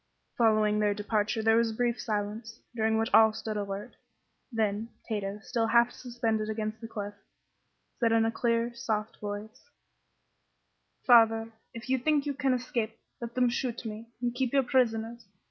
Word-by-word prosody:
Following 215 -2 +3
their 205 -1 +2
departure 210 +1 -1
there 225 +1 +5
was 230 0 +3
a 220 - -5
brief 240 0 0
silence, 215 +1 -3 0.2
during 220 -1 +1
which 225 +1 0
all 220 -1 +7
stood 220 0 -5
alert. 200 0 -5 0.5
Then, 220 -1 -1 0.2
Tato, 205 -2 -3
still 230 -2 0
half 235 +1 +4
suspended 230 -3 -2
against 215 0 -3
the 225 - -6
cliff, 205 -2 -5 0.9
said 230 -2 +3
in 225 0 +4
a 225 - +1
clear, 230 0 0
soft 220 -3 -3
voice: 210 - -7 1.4
"Father, 225 -2 +5 0.2
if 230 +1 -8
you 260 0 +1
think 295 +2 +1
you 290 - -1
can 270 -2 +1
escape, 235 -3 -3 0.2
let 235 0 -6
them 250 -1 +3
shoot 240 0 -3
me, 220 +1 -6 0.2
and 240 -1 0
keep 255 0 -1
your 275 -1 +4
prisoners. 235 -3 0
225 Hz, 165 wpm, -29 LUFS, 215-240 Hz, 1.4 s, all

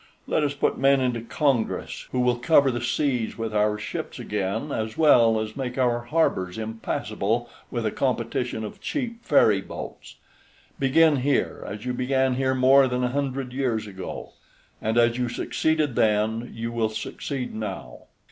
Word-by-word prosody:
Let 155 - +1
us 145 -1 0
put 140 - 0
men 135 0 +4
into 125 -3 0
Congress 120 0 -1
who 125 - 0
will 125 -1 +2
cover 140 +1 +4
the 120 -1 -3
seas 125 -1 -1
with 115 -1 -3
our 105 0 +2
ships 105 - -5
again, 105 +1 -3
as 110 0 -3
well 120 -8 +5
as 110 0 -4
make 130 -2 -4
our 120 -2 +1
harbors 115 - 0
impassable 110 +1 -2 0.2
with 120 -2 -3
a 110 - +1
competition 120 -2 -1
of 105 - -8
cheap 240 -5 -4
ferry 105 -9 +4
boats. - - -9 0.6
Begin 150 +3 +4
here, 135 +1 0
as 105 +3 -7
you 125 - -1
began 130 +1 +1
here 130 +1 +1
more 130 +1 +6
than 125 0 -1
a 125 - +1
hundred 135 -1 -2
years 125 -5 -1
ago, 95 -3 -7 0.5
and 110 +2 0
as 120 +1 +3
you 125 -1 0
succeeded 155 +3 0
then 110 +2 +1
you 115 +1 -4
will 115 -2 0
succeed 125 +4 -5
now. 110 -1 -6
125 Hz, 165 wpm, -25 LUFS, 110-135 Hz, 0.6 s, more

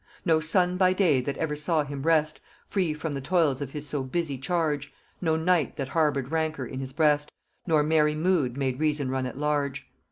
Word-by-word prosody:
No 160 -1 +4
sun 180 +3 +2
by 185 0 +4
day 170 -9 +3
that 140 +2 -4
ever 155 -2 -1
saw 150 +1 +1
him 140 -1 -6
rest 155 0 +2 0.3
Free 185 -5 0
from 155 +1 -4
the 140 -1 -4
toils 150 -3 +1
of 140 - -3
his 150 -1 -5
so 145 -1 -2
busy 140 +2 -2
charge, 145 0 -1 0.3
No 160 -3 +1
night 165 0 +1
that 135 -2 -4
harboured 145 -3 0
rancour 160 -4 -1
in 130 +2 -6
his 135 -1 -5
breast, 150 0 +2 0.4
Nor 155 -3 +3
merry 150 0 +2
mood 155 -6 +1
made 130 -2 -1
Reason 150 -3 0
run 130 -1 -1
at 125 - -8
large. 140 -2 -1
150 Hz, 200 wpm, -27 LUFS, 140-160 Hz, 0.4 s, No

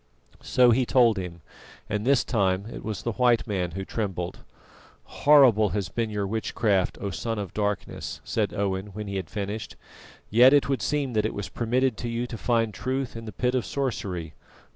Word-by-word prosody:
So 125 -1 +4
he 130 +3 +3
told 120 -3 +4
him, 85 -2 -7 0.5
and 105 +2 -2
this 135 -2 +4
time 95 -4 0
it - - -8
was 105 -3 -4
the 120 - -1
white 120 0 +2
man 95 -5 -1
who 95 - -4
trembled. 95 -6 -3 0.6
"Horrible 130 -8 +5
has 100 -3 -2
been 115 -2 -2
your 105 -1 -2
witchcraft, 105 -2 0
O 100 - -3
Son 110 +7 -3
of 100 -3 -5
Darkness!" 105 -1 -3
said - - -1
Owen, 95 0 -2
when 105 +1 -5
he 100 -1 -4
had 95 - -5
finished; 105 +1 -5 0.6
"yet 125 +5 +7
it 140 -5 +4
would 135 -5 0
seem 140 +3 -1
that 105 -1 +2
it - - -6
was 100 - -4
permitted 125 +1 0
to 120 - -4
you 115 +1 -2
to 120 - -7
find 115 -3 +1
truth 130 +5 -3
in 115 0 -7
the 110 - -6
pit 125 +2 -1
of 130 -2 +1
sorcery. 95 - -3
110 Hz, 190 wpm, -26 LUFS, 100-125 Hz, 0.6 s, yet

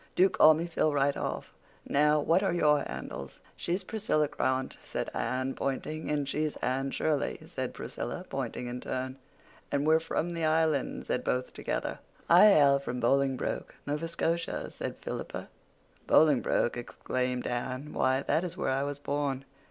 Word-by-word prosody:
Do 190 +2 +6
call 155 0 +7
me 165 +2 -2
Phil 160 -2 +1
right 140 -1 +2
off. - - -4 0.3
Now, 150 +1 +4
what 165 +5 +3
are 195 - +1
your 150 -3 +4
handles?" 70 - -7 0.2
"She's 180 +3 -2
Priscilla 185 -8 0
Grant," 130 -2 -1
said - - -4
Anne, 130 +1 -1
pointing. 155 +3 -3
"And 145 -2 0
she's 150 +1 -1
Anne 135 +2 -1
Shirley," 150 0 0
said - - -4
Priscilla, - - -5
pointing 125 - -4
in 125 +1 -5
turn. 130 +1 -4 0.5
"And 140 +1 +1
we're 160 +1 +5
from 170 +1 -2
the 165 -1 -3
Island," 155 -3 +1
said - - -1
both 125 0 -1
together. - - -3 0.3
"I 180 +5 +8
hail 140 -8 +6
from 125 -2 -4
Bolingbroke, 135 +1 0
Nova 150 +3 -2
Scotia," 165 0 -2
said - - -5
Philippa. - - -5 0.6
"Bolingbroke!" 145 -5 +4
exclaimed 125 +1 -2
Anne. 130 +4 -3
"Why, 130 +1 +2
that 165 - +1
is 180 - -5
where - - 0
I 135 +1 +1
was 140 0 -2
born." 140 -2 -2
145 Hz, 160 wpm, -30 LUFS, 130-160 Hz, 0.6 s, I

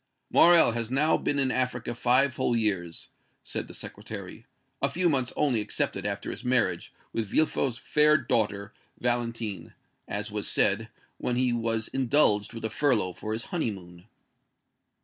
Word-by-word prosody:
"Morrel 170 -6 +6
has 115 -1 -3
now 145 +5 +3
been 145 - -1
in 135 -2 +2
Africa 125 -2 -1
five 125 +2 +2
whole 120 - +1
years," 95 -7 -1 0.3
said - - -5
the - - -11
Secretary - - -8 0.3
"a - - +2
few 180 +1 +1
months 130 -6 +1
only 125 -7 +2
excepted - - -2
after - - -4
his - - -8
marriage 115 -9 +1 0.2
with 115 -2 -2
Villefort's 135 -1 +1
fair 150 +3 +4
daughter, 105 -6 -1 0.3
Valentine, 115 -4 -3 0.3
(as 105 +1 -4
was 105 -1 -3
said) 110 +3 +1 0.3
when 125 - -1
he 125 -1 +1
was 115 -1 -1
indulged 130 -6 +2
with 115 -1 -6
a - - 0
furlough 110 -7 +1
for 110 - -6
his 110 +2 -2
honeymoon." 95 - -4
115 Hz, 150 wpm, -27 LUFS, 105-130 Hz, 0.3 s, Morrel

